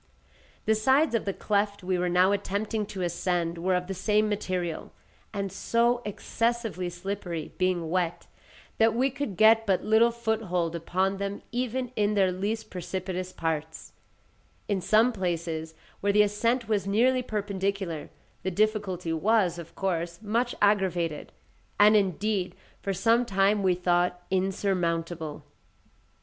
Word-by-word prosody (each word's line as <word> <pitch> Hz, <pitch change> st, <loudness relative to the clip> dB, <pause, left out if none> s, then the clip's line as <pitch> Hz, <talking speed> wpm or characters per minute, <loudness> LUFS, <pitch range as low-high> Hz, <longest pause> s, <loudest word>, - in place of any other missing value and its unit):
The 220 Hz, -, +4 dB
sides 265 Hz, +7 st, +3 dB
of 230 Hz, -, 0 dB
the 200 Hz, -, 0 dB
cleft 205 Hz, -1 st, -1 dB
we 185 Hz, 0 st, 0 dB
were 180 Hz, 0 st, 0 dB
now 180 Hz, +2 st, +4 dB
attempting 205 Hz, +2 st, -1 dB
to 190 Hz, -3 st, -5 dB
ascend 175 Hz, -1 st, -1 dB
were 185 Hz, +2 st, +1 dB
of 180 Hz, 0 st, -1 dB
the 195 Hz, -, -4 dB
same 210 Hz, +3 st, +2 dB
material, 185 Hz, -5 st, -3 dB, 0.4 s
and 200 Hz, -2 st, -3 dB
so 235 Hz, +5 st, +1 dB
excessively 225 Hz, -2 st, -2 dB
slippery, 175 Hz, -2 st, -5 dB
being 185 Hz, -3 st, +1 dB
wet, 175 Hz, -2 st, -1 dB, 0.5 s
that 225 Hz, 0 st, +4 dB
we 260 Hz, +3 st, +2 dB
could 260 Hz, -8 st, -4 dB
get 220 Hz, +1 st, +6 dB
but 190 Hz, -2 st, +2 dB
little 220 Hz, +2 st, +5 dB
foothold 220 Hz, -8 st, -1 dB
upon 185 Hz, +4 st, 0 dB
them 200 Hz, +1 st, -4 dB
even 250 Hz, +1 st, -2 dB
in 210 Hz, 0 st, +1 dB
their 190 Hz, -2 st, +3 dB
least 210 Hz, +5 st, -3 dB
precipitous 185 Hz, 0 st, -4 dB
parts; 160 Hz, -1 st, -4 dB, 0.8 s
in 200 Hz, -3 st, 0 dB
some 215 Hz, +6 st, +4 dB
places, 165 Hz, -4 st, -3 dB, 0.2 s
where 200 Hz, -, +1 dB
the 210 Hz, +1 st, +5 dB
ascent 230 Hz, +4 st, 0 dB
was 205 Hz, -3 st, 0 dB
nearly 250 Hz, +6 st, +3 dB
perpendicular, 200 Hz, -6 st, -3 dB, 0.3 s
the 190 Hz, -, -1 dB
difficulty 190 Hz, -4 st, 0 dB
was, 185 Hz, 0 st, +2 dB
of 170 Hz, -1 st, -10 dB
course, 170 Hz, -3 st, -2 dB
much 235 Hz, +4 st, 0 dB
aggravated; 180 Hz, -6 st, +1 dB, 0.5 s
and, 210 Hz, +1 st, +7 dB
indeed, 200 Hz, -1 st, 0 dB, 0.3 s
for 200 Hz, -, -2 dB
some 230 Hz, +5 st, +3 dB
time 200 Hz, -2 st, +2 dB
we 185 Hz, -2 st, +3 dB
thought 180 Hz, 0 st, +1 dB
insurmountable. 175 Hz, -5 st, -1 dB
195 Hz, 140 wpm, -27 LUFS, 180-215 Hz, 0.8 s, and